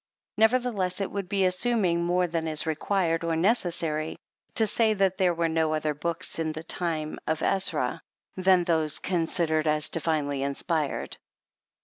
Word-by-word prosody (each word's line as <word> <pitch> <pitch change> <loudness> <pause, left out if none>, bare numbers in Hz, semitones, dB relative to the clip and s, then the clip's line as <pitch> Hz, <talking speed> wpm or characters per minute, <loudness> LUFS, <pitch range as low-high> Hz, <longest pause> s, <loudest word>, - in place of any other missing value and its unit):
Nevertheless, 220 -5 +2
it 195 - -2
would 195 -2 -4
be 195 -2 +2
assuming 185 -2 +1
more 180 +1 +2
than 165 -1 -2
is 155 -1 +1
required 165 +1 0
or 165 -1 0
necessary, 165 -5 0 0.4
to 225 - +4
say 220 +1 +2
that 195 -2 +1
there 180 -3 +2
were 165 0 +1
no 160 -1 +1
other 155 -1 -1
books 165 +3 -3
in 160 -1 -1
the 155 +1 -7
time 160 -2 -3
of 160 0 -1
Ezra, 165 -9 +1 0.3
than 185 -1 +4
those 160 -3 +1
considered 165 -3 0
as 150 0 +1
dii'inely 150 -4 -1
inspired. 145 +2 -2
170 Hz, 150 wpm, -27 LUFS, 155-190 Hz, 0.4 s, to